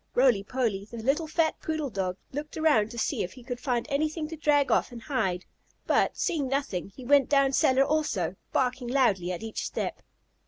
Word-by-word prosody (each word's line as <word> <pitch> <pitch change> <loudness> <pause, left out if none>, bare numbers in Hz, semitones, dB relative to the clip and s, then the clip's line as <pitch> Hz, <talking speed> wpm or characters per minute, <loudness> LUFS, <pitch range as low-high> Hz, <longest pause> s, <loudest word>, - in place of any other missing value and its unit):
Roly 245 -5 +4
Poly, 215 -3 -1
the 235 - -8
little 275 +8 0
fat 315 0 +1
poodle 310 -4 -2
dog 185 -2 -2
looked 295 +3 -5
around 295 -10 +3
to 235 - -9
see 225 - 0
if 180 - -4
he 255 - -13
could 245 0 -5
find 245 -4 -1
anything 305 +2 -1
to 325 - -5
drag 290 -2 +2
off - - +2
and 240 - -8
hide, 190 -10 -1 0.4
but, - - +2
seeing 320 -8 0
nothing, 270 -10 -2
he 255 - -10
went 280 0 +4
down 275 -1 +4
cellar 270 -2 +4
also, 290 - 0 0.2
barking 250 -1 0
loudly 220 -9 +2
at 180 +3 -5
each 225 -1 -4
step. - - -3
260 Hz, 195 wpm, -28 LUFS, 225-295 Hz, 0.4 s, Roly